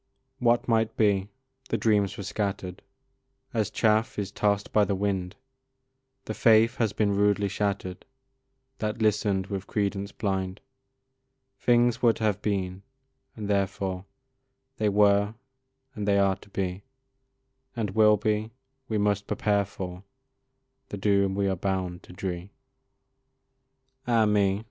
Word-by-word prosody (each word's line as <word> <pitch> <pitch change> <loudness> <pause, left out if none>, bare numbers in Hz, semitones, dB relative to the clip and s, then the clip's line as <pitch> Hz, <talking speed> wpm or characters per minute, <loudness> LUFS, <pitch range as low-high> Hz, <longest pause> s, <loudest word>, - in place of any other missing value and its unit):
What 120 +1 +2
might 115 -2 +1
be! 100 -3 +2 0.4
the - - +1
dreams 105 -3 +1
were 100 - -5
scatter'd, 95 -2 -3 0.7
As 110 -3 0
chaff 110 0 +1
is 100 -1 -3
toss'd 100 0 0
by 105 - +5
the 100 -1 0
wind, 95 -1 -2 0.9
The 110 - -3
faith 115 +2 +4
has 110 -4 +1
been 100 -1 +1
rudely 105 0 +2
shattered 100 -2 -2 0.8
That 105 +1 -2
listen'd 105 -3 +1
with 95 -1 -5
credence 100 -1 -2
blind; 95 -2 -2 1.0
Things 120 -1 +3
were 115 -2 +5
to 110 - -6
have 105 -2 +1
been, 95 -3 -2 0.5
and 105 -2 -5
therefore 95 -2 -1 0.7
They 105 -1 +2
were, 105 +1 +3 0.6
and 105 -4 -4
they 100 -1 +4
are 100 -1 +3
to 105 - -18
be, 95 -1 -3 0.9
And 110 -5 -2
will 105 +1 +5
be; 105 +1 -1 0.4
we 110 - 0
must 100 -1 0
prepare 100 -1 +1
for 90 -1 -7 0.9
The 100 - -5
doom 100 -1 +2
we 100 0 +1
are 95 - +1
bound 90 -1 -2
to - - -15
dree. 90 0 -5 1.6
Ah, 115 -2 +4
me! 100 -2 +2
100 Hz, 135 wpm, -27 LUFS, 95-105 Hz, 1.6 s, by